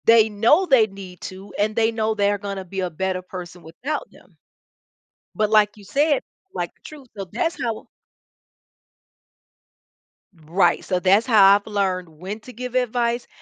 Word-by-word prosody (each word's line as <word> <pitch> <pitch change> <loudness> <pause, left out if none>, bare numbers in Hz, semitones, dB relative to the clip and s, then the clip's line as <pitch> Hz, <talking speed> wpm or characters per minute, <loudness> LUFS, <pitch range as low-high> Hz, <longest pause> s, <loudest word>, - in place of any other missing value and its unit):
They 225 -1 +6
know 230 - +3
they 260 -9 +5
need 195 -3 -11
to, 190 +2 -9
and 210 +1 +1
they 225 0 +2
know 220 -1 -1
they're 205 -1 +2
gonna 200 -2 -5
be 190 +2 -6
a 180 - -1
better 185 +2 -2
person 180 -1 -9
without 265 - -5
them. - - -21 1.0
But 215 -1 +1
like 210 -1 +3
you 205 - -14
said, 290 +4 +2 0.3
like, - - -4
the - - -37
truth 290 -4 -12
so, 195 - -4
that's 345 0 -2
how 230 -3 -3 2.6
Right. 175 +2 +2
So, 180 -2 -1
that's 195 +5 +4
how 200 -4 +7
I've 205 +1 -3
learned 190 -4 -1
when 180 +7 -8
to 250 - -12
give 250 +2 -6
advice 240 -1 0
210 Hz, 160 wpm, -22 LUFS, 190-235 Hz, 2.6 s, how